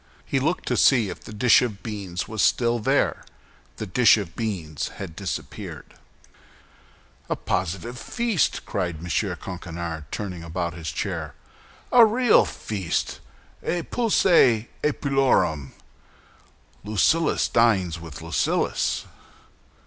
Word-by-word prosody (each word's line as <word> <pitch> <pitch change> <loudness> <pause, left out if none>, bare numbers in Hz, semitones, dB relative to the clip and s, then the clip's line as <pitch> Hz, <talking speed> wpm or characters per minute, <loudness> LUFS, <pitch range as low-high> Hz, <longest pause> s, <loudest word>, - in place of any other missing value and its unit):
He 135 - 0
looked 160 +7 -1
to - - +1
see 120 -7 +4
if - - -7
the - - -9
dish 110 +2 +5
of 110 -6 -3
beans 100 -5 -4
was 110 -2 -2
still 120 -1 +2
there; 105 - +1 0.5
the 110 - -4
dish 115 +4 +5
of 95 -6 -5
beans 90 -10 -3
had 80 - -7
disappeared. 95 -2 -6 1.4
"A - - +1
positive 95 +7 -3
feast!" 225 - 0
cried 90 -4 -2
M. 85 -2 -1
Coquenard, 85 -3 -6
turning 90 -4 -5
about 85 0 -3
in 85 - -9
his 80 -3 -4
chair, - - -4 0.6
"a 245 -1 +8
real 235 +2 +5
feast, 95 -6 -3 0.4
epulœ 170 - +3
epulorum. 135 - +1 1.1
Lucullus 110 - +2
dines 95 -8 +2
with 80 -2 -9
Lucullus." 80 -5 0
105 Hz, 115 wpm, -24 LUFS, 85-125 Hz, 1.4 s, a